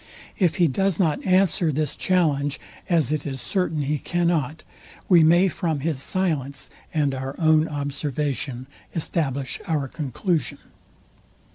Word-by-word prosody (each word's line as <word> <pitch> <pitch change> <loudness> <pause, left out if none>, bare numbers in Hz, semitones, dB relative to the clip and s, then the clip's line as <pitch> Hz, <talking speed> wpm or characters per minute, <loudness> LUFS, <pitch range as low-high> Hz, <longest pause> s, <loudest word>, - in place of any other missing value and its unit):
If 175 -5 +3
he 175 - +4
does 190 +5 +1
not 160 -6 +1
answer 185 -3 +3
this 150 0 -1
challenge, 145 -6 +1 0.3
as 160 -6 +3
it 155 -1 -1
is 135 -2 -4
certain 160 - -1
he 145 +1 -1
cannot, 170 -3 0 0.4
we 175 -4 +6
may 175 +4 +5
from 165 -5 -2
his 150 -3 -1
silence 145 -7 -2 0.2
and 145 -3 +1
our 135 +1 -4
own 160 -1 +4
observation 140 -2 -3 0.3
establish 140 -5 -2
our 150 -4 0
conclusion. 155 - -2
155 Hz, 130 wpm, -24 LUFS, 140-170 Hz, 0.4 s, we